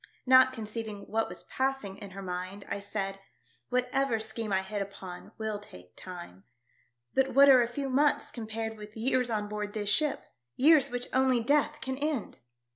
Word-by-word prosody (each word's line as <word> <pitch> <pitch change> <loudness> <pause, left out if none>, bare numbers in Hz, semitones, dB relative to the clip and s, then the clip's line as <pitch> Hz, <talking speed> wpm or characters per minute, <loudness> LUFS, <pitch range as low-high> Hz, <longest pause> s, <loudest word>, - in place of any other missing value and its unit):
Not 260 0 +7
conceiving 220 -3 -6
what 225 +2 -1
was - - -7
passing 265 -7 -2
in 205 - -8
her 195 +1 -8
mind, 185 +2 -5
I - - -3
said, 195 -1 -3 0.5
"Whatever 250 -1 +1
scheme 220 0 -4
I 190 0 +2
hit 205 +1 -3
upon 190 -2 -8
will 220 -2 -3
take 90 - -14
time. 175 - -9 0.7
But 265 -1 +1
what 280 +1 +8
are 260 -2 +8
a 235 - +2
few 275 +3 -4
months 280 +3 +2
compared 220 -1 -4
with 210 +1 -10
years 250 +1 +1
on 210 -2 -1
board 210 0 -4
this 205 -1 0
ship 300 +7 +1 0.2
— 120 0 -56
years 285 0 +5
which 245 0 -3
only 260 -1 +4
death 295 +5 +1
can 265 -3 -3
end 290 -6 -2
225 Hz, 180 wpm, -30 LUFS, 200-260 Hz, 0.7 s, what